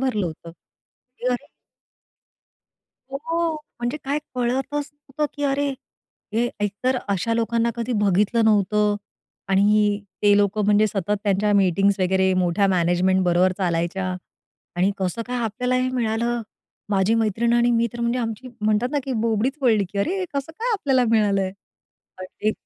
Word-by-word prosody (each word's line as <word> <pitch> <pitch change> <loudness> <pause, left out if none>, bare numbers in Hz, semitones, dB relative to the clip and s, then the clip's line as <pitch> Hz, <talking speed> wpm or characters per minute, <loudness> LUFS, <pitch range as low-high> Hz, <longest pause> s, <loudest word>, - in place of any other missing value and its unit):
भरलं 230 -8 0
होतं. 165 +1 -8
की 245 +8 -14
अरे 275 +4 -4 1.7
हो. 330 +3 -1 0.3
म्हणजे 240 +5 -1
काय 280 +2 0 0.2
कळतच 265 +4 -1
नव्हतं, 290 0 -4
की 290 - -6
अरे! 280 +1 +1 0.7
हे 240 +2 +2
एकतर 210 +6 0
अशा 200 +4 0
लोकांना 230 0 +1
कधी 235 +1 -2
बघितलं 210 +3 +2
नव्हतं 210 0 +3 0.5
आणि 205 +1 +3 0.2
ते 205 -1 +5
लोकं 205 +1 +2
म्हणजे 210 +1 +4
सतत 205 0 -1
त्यांच्या 205 +1 +2
मीटिंग्स 195 +1 +3
वगैरे 190 0 +2
मोठ्या 185 +2 +2
मॅनेजमेंट 185 +1 +2
बरोबर 180 +1 +3
चालायच्या 175 +1 -1 0.7
आणि 185 +3 +3
कसं 190 +4 -2
काय 250 0 -3
आपल्याला 250 +4 -1
हे 255 0 +1
मिळालं. 235 -1 -1 0.5
माझी 195 +2 +2
मैत्रीण 225 +1 +1
आणि 240 0 +3
मी 235 0 +2
तर 240 - -7
म्हणजे 235 +1 0
आमची 230 +1 -4
म्हणतात 215 +3 +1
ना, 290 - +1
की 265 - -3
बोबडीच 230 +3 +1
वळली 220 -5 +3
की 200 - -3
"अरे! 345 - 0
हे 370 - -1
कसं 280 +3 -3
काय 475 +1 0
आपल्याला 270 - +2
मिळालंय?" 200 -4 +2 0.7
अगदी. 185 +3 -3
215 Hz, 150 wpm, -23 LUFS, 195-250 Hz, 1.7 s, ते